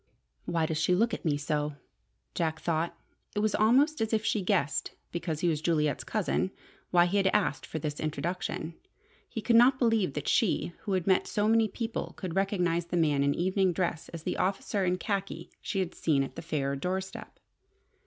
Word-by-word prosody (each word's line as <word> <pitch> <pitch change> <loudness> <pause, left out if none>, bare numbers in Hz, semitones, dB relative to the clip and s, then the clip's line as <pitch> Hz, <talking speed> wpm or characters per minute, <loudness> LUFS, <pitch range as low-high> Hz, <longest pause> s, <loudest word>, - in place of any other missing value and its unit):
"Why 165 -2 +1
does 155 -1 -1
she 180 +3 +3
look 225 +5 +2
at - - -4
me 145 -3 +2
so?" 150 0 -1 0.6
Jack 160 -1 -1
thought. 165 0 -1 0.4
It - - +1
was 215 -1 +1
almost 270 +8 +4
as 225 0 0
if 220 0 +1
she 210 - +1
guessed, 150 -5 0 0.2
because 170 -2 -3
he 175 - +2
was 155 -3 +1
Juliet's 155 -3 +1
cousin, 205 -2 0 0.4
why 175 -1 +5
he 185 +3 0
had 195 -1 +3
asked 200 -6 +1
for - - -4
this 150 -1 -3
introduction. 165 +2 -3 0.6
He 225 - -4
could 235 - +3
not 250 +3 +7
believe 225 - +2
that 150 - -4
she, 185 -5 +2
who 195 -3 +1
met 190 -1 +3
so 210 0 0
many 225 0 +4
people, 225 +2 -4
could 180 -4 -5
recognize 180 -4 +1
the 175 - -1
man 150 -4 +3
in 140 0 +2
evening 185 +1 +2
dress 170 -2 -2
as 165 -2 -8
the - - -2
officer 195 +1 0
in 180 0 +1
khaki 195 0 -3
she - - -3
had 185 -3 -1
seen 145 -4 +1
on 135 - -5
the - - -7
Phayre 140 -4 -1
doorstep. 190 +6 -4
180 Hz, 195 wpm, -29 LUFS, 160-205 Hz, 0.6 s, not